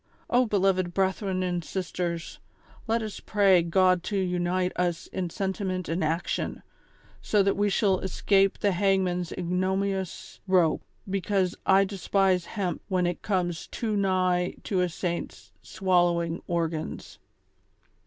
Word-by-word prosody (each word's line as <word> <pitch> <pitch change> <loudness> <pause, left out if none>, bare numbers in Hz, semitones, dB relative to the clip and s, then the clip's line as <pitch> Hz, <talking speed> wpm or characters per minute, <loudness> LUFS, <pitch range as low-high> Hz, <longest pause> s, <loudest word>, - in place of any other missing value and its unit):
O 245 0 +4
beloved 185 -3 +1
brethren 190 0 0
and 175 -1 -1
sisters, 175 -2 -4 0.5
let 225 0 +1
us 215 -2 -6
pray 195 -4 +4
God 180 +1 +3
to 205 - -1
unite 180 0 0
us 175 -2 -1
in 180 -2 -4
sentiment 190 -1 -3
and 165 +1 -1
action, 160 +3 -2 0.6
so 210 -2 +2
that 200 - +2
we 205 0 +1
shall 195 -2 +2
escape 195 +1 +2
the 205 - +1
hangman's 180 -2 +1
ignominious 190 +1 -2
rope; 180 -4 +3 0.3
because 190 -1 0
I 195 +1 +6
despise 190 -2 +1
hemp 190 -3 -3
when 185 -2 +1
it 175 0 -2
comes 175 -5 -1
too 220 -3 -2
nigh 185 -2 +1
to 190 -3 0
a 180 - +1
saint's 170 0 -5
swallowing 175 -2 +1
organs." 165 -2 -3
185 Hz, 130 wpm, -27 LUFS, 175-195 Hz, 0.6 s, I